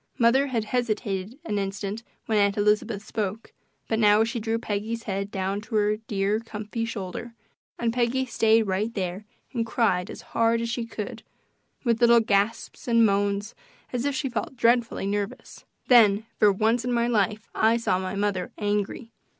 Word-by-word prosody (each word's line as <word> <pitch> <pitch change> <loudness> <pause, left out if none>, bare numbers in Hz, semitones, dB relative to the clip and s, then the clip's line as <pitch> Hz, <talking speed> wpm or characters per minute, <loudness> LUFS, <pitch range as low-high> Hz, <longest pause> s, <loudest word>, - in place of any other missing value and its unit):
Mother 260 +3 +4
had 235 -5 -1
hesitated 215 -2 -2
an 205 -2 -1
instant 200 +2 -3 0.2
when 220 -2 +1
Aunt 200 0 +2
Elizabeth 210 0 +1
spoke, 210 +1 -4 0.3
but 220 - 0
now 210 0 +5
she 235 +2 -2
drew 225 +1 -1
Peggy's 225 +1 -3
head 200 -1 -3
down 195 +1 -2
to 225 +1 -6
her 210 0 +2
dear, 210 -1 -1
comfy 225 0 -5
shoulder, 230 +1 -6 0.4
and 230 -1 0
Peggy 250 +2 +1
stayed 225 -2 +3
right 205 +3 -1
there 190 +1 -3 0.3
and 235 -3 0
cried 215 -5 +1
as - - -9
hard 230 0 +3
as 230 0 -2
she 235 -1 -3
could 215 -2 -6 0.6
with 235 -2 +1
little 235 0 +7
gasps 210 +2 0
and 230 -1 +5
moans 200 +1 0 0.4
as 245 -1 -1
if 285 -1 0
she 270 +1 -1
felt 245 +2 -4
dreadfully 235 -3 +2
nervous. 200 0 -4 0.2
Then, 220 -4 +6
for 210 -1 +6
once 220 +4 +1
in 250 - -2
my 235 -1 +2
life, 215 -2 0
I 225 +1 +3
saw 185 -5 0
my 185 +1 -4
mother 200 -3 -1
angry. 210 +2 -2
220 Hz, 170 wpm, -26 LUFS, 200-230 Hz, 0.6 s, little